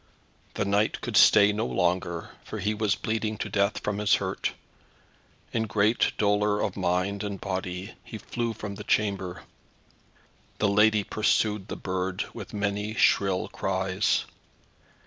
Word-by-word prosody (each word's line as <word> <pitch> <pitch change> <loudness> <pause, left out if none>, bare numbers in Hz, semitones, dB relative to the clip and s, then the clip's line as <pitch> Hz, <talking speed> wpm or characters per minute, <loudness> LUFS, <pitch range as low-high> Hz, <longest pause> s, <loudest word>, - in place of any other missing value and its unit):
The - - 0
knight 100 +2 +1
could - - -4
stay 105 0 +7
no 110 +3 -1
longer, 85 -1 -1
for - - -7
he 105 +3 0
was 105 -2 +1
bleeding 110 -1 -2
to - - -4
death 100 +1 +1
from 105 -1 -2
his 105 -1 +4
hurt. - - -2 1.0
In 110 -1 0
great 105 +2 +2
dolour 105 0 +2
of 100 - -1
mind 95 +2 0
and 100 -2 -4
body 95 0 -4
he 110 - -8
flew 115 +1 -3
from 105 -2 -6
the 105 +1 -8
chamber. 95 -4 -1 1.1
The 105 - +2
lady 105 +1 +4
pursued 105 -1 +1
the - - -5
bird 95 +1 -2
with 110 -4 -8
many 105 +1 -2
shrill 95 -4 +3
cries. 95 +1 0
100 Hz, 145 wpm, -27 LUFS, 95-105 Hz, 1.1 s, stay